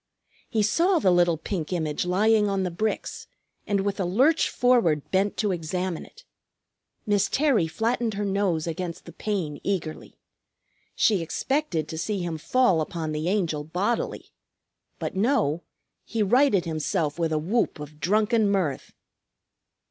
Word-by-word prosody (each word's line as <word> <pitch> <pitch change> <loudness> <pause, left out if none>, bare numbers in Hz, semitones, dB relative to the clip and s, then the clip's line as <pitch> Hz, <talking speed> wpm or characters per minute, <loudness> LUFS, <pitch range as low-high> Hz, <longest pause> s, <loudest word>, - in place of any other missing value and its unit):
He 220 -4 +1
saw 340 - +3
the 190 - +3
little 175 -2 +3
pink 165 0 -4
image 160 -3 -1
lying 210 +3 +3
on 195 -1 0
the 180 - -2
bricks, 215 +5 -3 0.4
and 200 -2 +1
with 200 +1 -2
a - - +1
lurch 260 - +3
forward 230 - +2
bent 195 +2 +1
to 210 -3 +1
examine 180 +1 -3
it. 485 - -18 0.8
Miss 205 -2 +2
Terry 270 - +2
flattened 225 +4 -1
her 205 +1 -2
nose 195 -5 0
against 170 +1 -5
the - - -9
pane 180 -9 -3
eagerly. 170 -6 -4 0.8
She 205 -6 +3
expected 175 - -1
to 160 0 -5
see 210 +4 -2
him 165 -2 -3
fall 245 -3 +3
upon 160 0 -3
the 155 +3 -1
Angel 170 -7 0
bodily. 185 +9 -2 0.7
But - - -4
no; 190 - +1 0.4
he 225 -2 -1
righted 210 -3 +3
himself 155 -1 -1
with 165 -1 0
a 155 - +1
whoop 185 +3 0
of 150 0 -9
drunken 215 +4 +2
mirth. 180 -9 -1
190 Hz, 150 wpm, -25 LUFS, 165-215 Hz, 0.8 s, saw